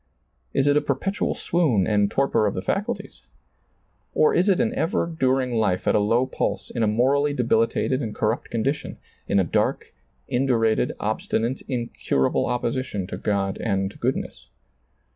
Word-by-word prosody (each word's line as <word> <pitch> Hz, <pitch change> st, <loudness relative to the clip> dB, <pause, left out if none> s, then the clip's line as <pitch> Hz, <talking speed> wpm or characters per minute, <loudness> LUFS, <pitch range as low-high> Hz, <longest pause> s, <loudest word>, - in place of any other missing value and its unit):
Is 135 Hz, -, +1 dB
it 145 Hz, 0 st, +4 dB
a 150 Hz, -, +4 dB
perpetual 195 Hz, +9 st, -1 dB
swoon 140 Hz, -, +1 dB
and 105 Hz, -1 st, +2 dB
torpor 135 Hz, -5 st, +2 dB
of 100 Hz, -, -2 dB
the 95 Hz, -, -3 dB
&cuhies? 200 Hz, +1 st, -3 dB, 0.9 s
Or 455 Hz, -, +4 dB
is 185 Hz, -, +3 dB
it 190 Hz, -, +3 dB
an 235 Hz, 0 st, +1 dB
ever 220 Hz, -5 st, 0 dB
during 130 Hz, -6 st, 0 dB
life 105 Hz, -5 st, 0 dB
at -, -, +4 dB
a -, -, +4 dB
low 115 Hz, +5 st, +2 dB
pulse, 130 Hz, -, -3 dB
in 120 Hz, -, -3 dB
a 110 Hz, -, +3 dB
morally 135 Hz, +7 st, +2 dB
debilitated 125 Hz, +1 st, +1 dB
and 110 Hz, -5 st, -4 dB
corrupt 110 Hz, +2 st, -1 dB
condition, 135 Hz, +6 st, -2 dB, 0.3 s
in 100 Hz, -, +2 dB
a -, -, +4 dB
dark, 85 Hz, -, -1 dB, 0.3 s
indurated, 120 Hz, -4 st, +1 dB
obstinate, 120 Hz, +4 st, -1 dB
incurable 120 Hz, -, 0 dB
opposition 120 Hz, -4 st, -2 dB
to 90 Hz, -, -6 dB
God 100 Hz, -1 st, -1 dB
and 95 Hz, -2 st, -1 dB
goodness 130 Hz, +3 st, -3 dB
120 Hz, 155 wpm, -24 LUFS, 105-140 Hz, 0.9 s, it